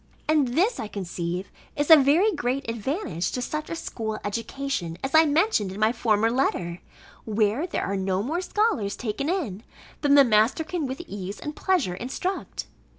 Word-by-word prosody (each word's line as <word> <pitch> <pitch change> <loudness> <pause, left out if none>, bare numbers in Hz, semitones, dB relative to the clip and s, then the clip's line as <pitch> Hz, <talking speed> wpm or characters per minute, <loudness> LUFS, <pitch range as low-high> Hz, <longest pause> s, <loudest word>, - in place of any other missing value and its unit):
And 290 -5 +2
this, 415 +9 +2
I 220 - -3
conceive, 180 -2 -4 0.2
is 290 +2 +1
a - - +13
very 310 +9 +4
great 260 -2 -2
advantage 230 - -2
to - - -2
such 305 +4 -4
a - - -3
school 220 -8 -4
education, 230 -4 -3
as 270 - -3
I 320 0 +7
mentioned 300 - +2
in 195 - -7
my 215 +1 +4
former 225 -1 +2
letter, 180 -9 -1 0.4
where 220 - +1
there - - -2
are 200 - -2
no 190 0 0
more 320 +9 -1
scholars 370 - 0
taken 245 +6 -3
in, 280 - -2 0.4
than 285 -1 +4
the 280 - +9
master 225 +5 +3
can 320 -2 -3
with 260 +5 -5
ease 200 - -6
and 300 0 -6
pleasure 360 - +1
instruct. 260 - -4
250 Hz, 175 wpm, -25 LUFS, 205-310 Hz, 0.4 s, a